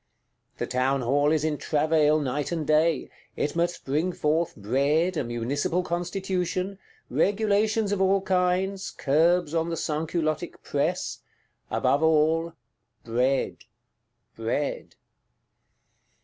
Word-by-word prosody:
The -, -, -2 dB
Townhall 135 Hz, +3 st, +1 dB
is 155 Hz, -1 st, +1 dB
in 155 Hz, -2 st, -1 dB
travail, 155 Hz, 0 st, +2 dB
night 145 Hz, +1 st, -2 dB
and 165 Hz, -3 st, -2 dB
day; 155 Hz, -1 st, +2 dB, 0.2 s
it 145 Hz, -, -2 dB
must 175 Hz, +1 st, -1 dB
bring 155 Hz, +7 st, 0 dB
forth 160 Hz, +2 st, 0 dB
Bread, 140 Hz, -, +1 dB
a 150 Hz, -, 0 dB
Municipal 130 Hz, +9 st, -1 dB
Constitution, 185 Hz, +2 st, -2 dB, 0.3 s
regulations 210 Hz, +1 st, +1 dB
of 200 Hz, -2 st, 0 dB
all 195 Hz, +1 st, +3 dB
kinds, 190 Hz, +1 st, 0 dB
curbs 165 Hz, +3 st, +2 dB
on 165 Hz, 0 st, 0 dB
the 165 Hz, -, -3 dB
Sansculottic 155 Hz, 0 st, -2 dB
Press; -, -, -1 dB, 0.5 s
above 140 Hz, -, +1 dB
all, 160 Hz, +1 st, +2 dB, 0.5 s
Bread, 125 Hz, +4 st, 0 dB, 0.8 s
Bread. 115 Hz, +6 st, -3 dB
160 Hz, 105 wpm, -26 LUFS, 145-180 Hz, 0.8 s, all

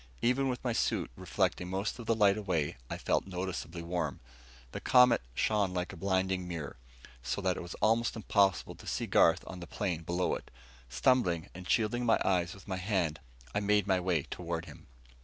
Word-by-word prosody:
Even 130 Hz, +3 st, +2 dB
with 125 Hz, -, -3 dB
my 120 Hz, -2 st, 0 dB
suit -, -, 0 dB
reflecting 90 Hz, +7 st, -1 dB
most 95 Hz, +5 st, -2 dB
of 115 Hz, -, -8 dB
the 115 Hz, -, +3 dB
light 100 Hz, -2 st, +5 dB
away, 90 Hz, -8 st, -1 dB
I -, -, -3 dB
felt -, -, 0 dB
noticeably 90 Hz, -2 st, -4 dB
warm. 85 Hz, +1 st, -2 dB, 0.5 s
The -, -, -5 dB
Comet 125 Hz, -, +6 dB
shone 100 Hz, -4 st, +1 dB
like 90 Hz, 0 st, -2 dB
a -, -, -7 dB
blinding 95 Hz, 0 st, 0 dB
mirror, 80 Hz, -7 st, -5 dB, 0.4 s
so 60 Hz, +10 st, -2 dB
that 95 Hz, -2 st, +1 dB
it -, -, -5 dB
was 85 Hz, 0 st, -7 dB
almost 115 Hz, +2 st, +3 dB
impossible 100 Hz, -4 st, +2 dB
to -, -, -14 dB
see -, -, -1 dB
Garth -, -, +4 dB
on 90 Hz, -, -8 dB
the 85 Hz, -, -8 dB
plain 90 Hz, -6 st, -2 dB
below 85 Hz, +2 st, 0 dB
it. -, -, -5 dB, 0.4 s
Stumbling, 85 Hz, -, +2 dB
and 90 Hz, 0 st, -9 dB
shielding 115 Hz, +2 st, +2 dB
my 115 Hz, -2 st, +4 dB
eyes 90 Hz, -2 st, +1 dB
with 100 Hz, -, -15 dB
my 95 Hz, -2 st, -2 dB
hand, 90 Hz, -5 st, 0 dB, 0.3 s
I -, -, +1 dB
made 105 Hz, -1 st, +2 dB
my 95 Hz, -2 st, +2 dB
way 90 Hz, -5 st, +1 dB
toward 85 Hz, 0 st, -4 dB
him. -, -, -13 dB
95 Hz, 195 wpm, -31 LUFS, 85-105 Hz, 0.5 s, Comet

